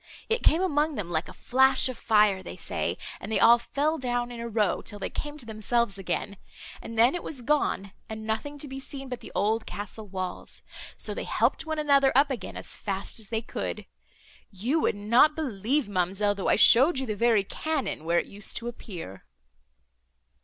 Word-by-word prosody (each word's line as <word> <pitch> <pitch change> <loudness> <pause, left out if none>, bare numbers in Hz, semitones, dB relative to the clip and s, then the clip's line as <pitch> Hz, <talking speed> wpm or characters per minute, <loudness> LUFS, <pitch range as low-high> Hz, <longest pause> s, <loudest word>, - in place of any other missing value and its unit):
It 455 +2 +1
came 330 +4 +4
among 300 -3 +1
them 185 -6 -4
like 160 0 -1
a - - -10
flash 265 +1 +3
of 255 - -4
fire, 210 -5 +3
they - - -8
say, - - -2 0.2
and - - -7
they - - +2
all 235 +1 +7
fell 295 +6 -1
down 245 -1 -1
in 240 - -7
a 235 0 -4
row, 210 -4 +1
till 205 - -4
they 195 - -4
came 295 0 -5
to 265 - -9
themselves 220 -1 0
again; 200 +1 -3 0.4
and 225 - -8
then 235 +3 +6
it 355 - -3
was 265 -5 -6
gone, 240 -8 0 0.2
and 220 0 -6
nothing 285 +7 -3
to 290 - -7
be 270 0 -6
seen 270 0 -8
but 250 -2 -4
the - - -11
old 220 +2 +1
castle 210 +1 -7
walls; 185 -1 -5 0.3
so - - -2
they - - -5
helped - - +1
one 315 0 -2
another 280 -3 +4
up 280 +1 +5
again 235 -8 -5
as - - -4
fast 195 +2 -4
as 215 -3 -11
they 225 0 -1
could. - - -4 0.6
You 230 - 0
would 300 - +1
not 235 +9 +4
believe, 260 -1 -1
ma'amselle, 195 +2 +1
though 200 -2 -2
I - - +5
showed 265 +6 +6
you 265 - -1
the 215 -3 -3
very 225 -1 +3
cannon, 275 - -3
where 170 +1 +1
it - - +2
used 205 +1 -4
to 235 - -4
appear." 175 - -8
235 Hz, 205 wpm, -27 LUFS, 205-275 Hz, 0.6 s, all